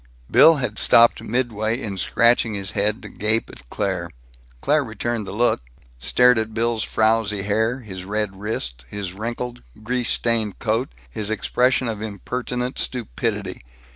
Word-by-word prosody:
Bill 165 - +8
had 125 -7 -2
stopped 115 0 +6
midway 115 -1 -1
in 105 -6 -4
scratching 115 +1 +3
his 95 -2 -4
head 105 +4 0
to 105 - -7
gape 110 +2 0
at - - -16
Claire. - - -2 0.5
Claire 150 - +2
returned 110 -2 -3
the - - -5
look, 115 - +1 0.4
stared 125 - +4
at 110 0 -4
Bill's 115 -1 0
frowsy 110 -2 +1
hair, 110 +5 0
his 95 -5 -8
red 100 0 -3
wrists, 65 - -3
his 100 -3 -5
wrinkled, 120 +4 -5 0.2
grease 125 +1 -1
stained 115 -4 0
coat, 115 +3 -1 0.2
his 105 - -4
expression 125 +3 +1
of 110 -2 -4
impertinent 125 +4 -4
stupidity. 105 -5 -3
110 Hz, 145 wpm, -22 LUFS, 105-120 Hz, 0.5 s, Bill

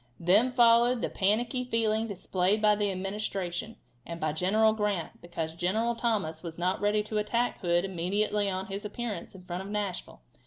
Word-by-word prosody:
Then 200 +9 +4
followed 240 0 +5
the - - -1
panicky 230 +6 +1
feeling 225 -2 +1
displayed 195 0 0
by 210 0 +5
the 205 -1 0
Administration, 195 +1 -3 0.3
and 170 +4 -7
by 155 -2 -1
General 215 +7 +3
Grant, 210 -5 -2
because 165 -2 -4
General 215 +8 0
Thomas 210 -10 -1
was 165 -2 -7
not 180 +2 -1
ready 210 +1 +2
to 215 0 -2
attack 235 +3 0
Hood 175 -1 +1
immediately 200 +3 0
on 190 0 -3
his 195 +2 -6
appearance 210 -4 -5
in 185 - -12
front 180 0 -5
of 195 - -8
Nashville. 205 -3 -4
205 Hz, 170 wpm, -29 LUFS, 180-220 Hz, 0.3 s, followed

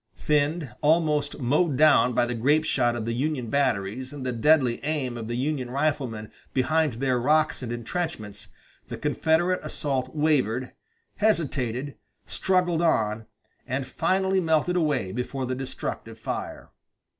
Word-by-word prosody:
Thinned, 150 -3 0
almost 150 -2 +2
mowed 145 +3 +1
down 150 -4 +5
by 120 0 +3
the 120 - -3
grape 145 +7 +2
shot 120 -3 +1
of 115 -2 -3
the 115 - -1
Union 130 -2 -2
batteries 130 -2 0
and 145 -3 -7
the 125 - 0
deadly 125 0 +3
aim 145 -5 -2
of 115 -2 -6
the 120 +1 -3
Union 135 -1 -2
riflemen 130 -6 -2 0.2
behind 150 +2 +2
their 125 +1 0
rocks 155 +4 +2
and 120 -2 -5
intrenchments 115 - -4 0.4
the - - -6
Confederate 175 +3 +1
assault 135 -3 -3
wavered, 130 -5 +1 0.5
hesitated, 140 - 0 0.3
struggled 180 -3 +1
on, 110 -9 +1 0.4
and 130 +2 -2
finally 190 +6 +1
melted 160 0 +1
away 150 - 0
before 125 +4 -3
the 130 - -2
destructive 130 0 -5
fire. - - -5
140 Hz, 140 wpm, -26 LUFS, 120-155 Hz, 0.5 s, down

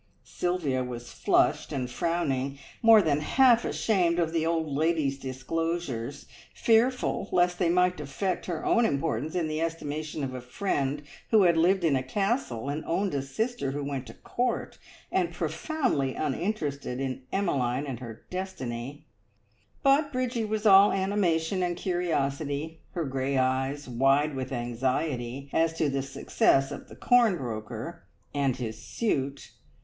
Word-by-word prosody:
Sylvia 160 -8 -1
was 120 -1 -7
flushed - - +2
and 130 -2 -2
frowning, 140 -1 -1 0.2
more 225 -2 +7
than 150 -3 +2
half 240 - +4
ashamed 180 -6 +1
of 165 -2 0
the 165 -1 +1
old 165 -1 +1
lady's 150 -1 0
disclosures, 140 -1 -3 0.3
fearful 235 -2 +2
lest 175 0 +2
they 175 - +2
might 180 0 +2
affect 150 +7 -3
her 170 -3 -3
own 235 - +4
importance 145 - -1
in 170 -3 0
the 155 +1 -2
estimation 155 -2 -3
of 130 -1 -3
a 130 - -5
friend 140 0 -2 0.3
who 215 -3 +6
had 170 -2 +5
lived 180 +3 +3
in 155 -4 +3
a 130 - +1
Castle, 165 - -1
and 145 +2 -2
owned 195 +3 0
a 140 - 0
sister 220 - -2
who 145 0 -3
went 140 -2 -4
to - - -10
Court, 245 0 -2 0.3
and - - +1
profoundly 250 - -1
uninterested 145 -5 -2
in 130 -1 -3
Emmeline 140 -9 0
and 130 -5 -5
her 115 -3 -9
destiny; 145 -7 -5 0.8
but 285 +1 +4
Bridgie 255 -3 -1
was 215 0 -2
all 200 0 +8
animation 190 -3 +1
and 175 -1 -1
curiosity, 160 -3 -1
her 170 -3 -2
grey 135 0 -1
eyes 135 +2 0
wide 135 +4 +2
with 130 0 -4
anxiety 125 +2 -2
as 165 0 +2
to 155 -2 0
the 135 0 -1
success 135 0 +2
of - - -8
the - - -11
corn 235 -6 +4
broker 110 -6 -6 0.3
and 140 -3 +1
his 110 -4 -5
suit. 135 - -2
150 Hz, 150 wpm, -28 LUFS, 135-180 Hz, 0.8 s, all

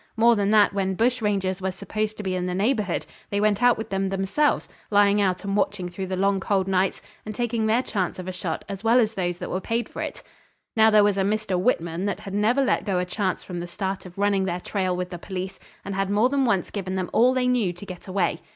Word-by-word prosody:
More 235 +1 +5
than 200 -1 +1
that, 210 -2 +5
when 190 -1 0
bush 240 +4 +1
rangers 195 -3 0
were 190 - 0
supposed 215 +3 -3
to 210 - -5
be 190 -1 -1
in 180 0 -1
the 180 - -2
neighbourhood 210 -2 0 0.2
they 200 - 0
went 210 0 +2
out 245 -1 +5
with 220 - -6
them 195 0 0
themselves, 195 +10 +1 0.2
lying 205 0 +4
out 185 -1 0
and 200 0 -2
watching 200 -3 0
through 190 +2 -5
the 185 - -2
long 195 +1 +2
cold 190 -1 0
nights, 190 0 +1 0.2
and 215 0 -6
taking 230 -1 0
their 230 +4 +3
chance 190 -8 -2
of 185 -1 -7
a - - -2
shot 180 -3 -4
as 195 0 -6
well 230 +2 +5
as 220 -2 +2
those 175 -3 -2
that - - -6
were 185 - -1
paid 230 +3 -1
for - - -7
it. - - -5 0.5
Now 220 0 +6
there 210 -1 +6
was 205 -1 +2
a - - +3
Mr. 210 0 0
Whitman 180 -3 0
that 200 - -3
had 195 - -7
never 225 +7 +2
let - - +1
go 195 -4 0
a 180 - 0
chance 185 0 -2
from 180 -2 -6
the 175 - -5
start 190 +1 -4
of 180 - -15
running 200 -1 +2
their 175 -1 -2
trail 185 -1 -1
with 180 0 -4
the 175 - -6
police, 190 +1 -5 0.3
and 195 - -4
had 195 0 -1
more 210 +5 +3
than 275 -1 +1
once 200 -7 +1
given 190 -2 -3
them 185 -1 -3
all 250 +3 +4
they 255 -1 +1
knew 240 -7 +2
to 175 +3 -11
get 185 -1 -9
away. 190 0 0
195 Hz, 260 wpm, -24 LUFS, 185-215 Hz, 0.5 s, Now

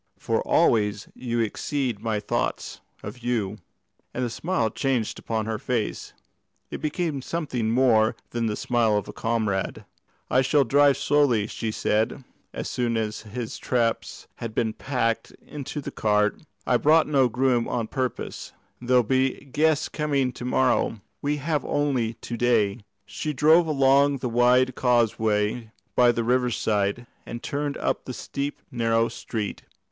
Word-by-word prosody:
"For - - 0
always 105 -2 +2
you 120 -2 -2
exceed 120 +1 -2
my 110 -2 -1
thoughts 105 - -3 0.2
of 105 +5 -7
you;" 110 -4 -2 0.6
and 125 - 0
the 120 - -4
smile 160 -7 -1
changed 130 -6 -1
upon 110 -1 -2
her 110 -1 -3
face 120 -4 -3 0.6
it - - -5
became 155 -2 -2
something 130 -7 -2
more 115 -2 +3 0.2
than 120 -1 -1
the 105 - -1
smile 115 -3 +1
of 105 - -3
a - - -8
comrade. 110 -4 -1 0.4
"I 130 - +3
shall 140 +2 +3
drive 140 +2 +4
slowly," 140 -8 +2
she 110 +1 -4
said, 110 +3 0 0.3
as - - -5
soon 120 -2 -1
as 110 -1 -2
his 110 +2 -6
traps 115 -3 -1
had 115 -2 -6
been 110 -2 0
packed 120 -4 -1
into 145 0 -6
the - - -6
cart; 105 -1 +1 0.2
"I 125 - +3
brought 155 +5 +4
no 135 -4 +3
groom 125 -1 +1
on 115 -2 -1
purpose. 130 +1 -4 0.3
There 125 +1 +1
will 125 - +6
be 130 +3 0
guests 155 +2 +2
coming 140 -4 0
to 125 - -9
morrow. 125 -3 +1 0.2
We 145 +1 0
have 150 +1 -1
only 130 -6 0
to 120 - -6
day." 115 -3 +2 0.3
She 150 +8 -4
drove 160 +4 +5
along 140 -1 +4
the 125 -1 -3
wide 125 +2 +4
causeway 110 -2 +1 0.3
by 120 -1 +6
the 115 0 -1
riverside, 120 -3 0 0.2
and 120 0 -7
turned 145 0 -2
up - - -1
the 130 - -5
steep, 140 +1 -5
narrow 115 -2 +2
street. 110 -2 -5
120 Hz, 150 wpm, -25 LUFS, 110-135 Hz, 0.6 s, will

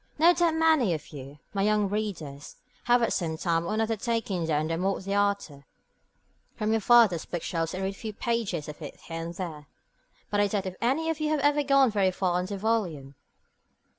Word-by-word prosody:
No 335 +3 +6
doubt 340 -1 +2
many 315 - +3
of 155 - -9
you, 140 -1 -10 0.2
my 200 - -1
young 210 0 +2
readers, 180 -9 -5 0.3
have 240 0 +4
at - - +1
some 160 -3 -2
time 170 0 0
or 215 - -1
another 225 +1 0
taken 210 -6 -2
down 155 -1 +1
the 165 - -1
Morte 190 +2 -1
D'Arthur 200 -8 -1 0.9
from 215 -1 -1
your 225 0 +2
father's 220 -7 +5
bookshelves 165 -1 -3
and 190 - -3
read 195 +1 -1
a - - -16
few 220 - -5
pages 210 -8 -2
of 150 +1 -9
it 145 - -8
here 165 0 -6
and 170 +1 -6
there. 160 -6 -6 0.6
But 205 - +1
I 205 - +4
doubt 200 -1 -2
if 185 -1 -5
any 300 +7 +1
of 320 - -5
you 305 0 0
have 305 -2 +1
ever 290 +1 +3
gone 275 -3 +4
very 200 -3 +2
far 180 -1 0
in 180 - -3
the 200 0 -4
volume. 185 -11 -1
200 Hz, 205 wpm, -27 LUFS, 165-230 Hz, 0.9 s, No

